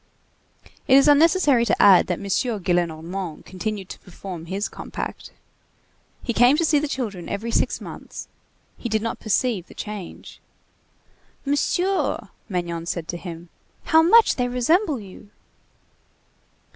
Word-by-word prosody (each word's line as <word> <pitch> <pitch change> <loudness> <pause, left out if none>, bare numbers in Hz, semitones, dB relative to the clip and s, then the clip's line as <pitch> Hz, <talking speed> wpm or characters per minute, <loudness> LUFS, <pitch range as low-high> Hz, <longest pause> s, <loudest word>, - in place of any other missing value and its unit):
It 265 - +6
is 275 +2 +6
unnecessary 295 -3 +5
to 235 - 0
add 190 -3 +7
that 180 - -1
M. - - -9
Gillenormand 175 - -2
continued 195 +1 -5
to - - -9
perform 180 -2 -9
his 195 +4 -2
compact. - - -7 0.9
He 235 - -2
came 245 +5 +5
to 335 - +2
see 300 -2 +3
the 300 - -2
children 215 -11 -4
every 220 +4 -3
six - - 0
months. - - -9 0.5
He 240 - -4
did 220 0 0
not 230 - -3
perceive 215 -3 0
the - - -15
change. 210 -4 -8 1.0
"Monsieur," 355 +7 0 0.2
Magnon 170 -3 -3
said 170 -2 -3
to 175 - -3
him, 170 -1 -9 0.3
"how 320 0 +5
much 445 +8 +5
they 250 -1 +1
resemble 285 - +1
you!" 200 0 -13
215 Hz, 135 wpm, -23 LUFS, 180-275 Hz, 1.0 s, add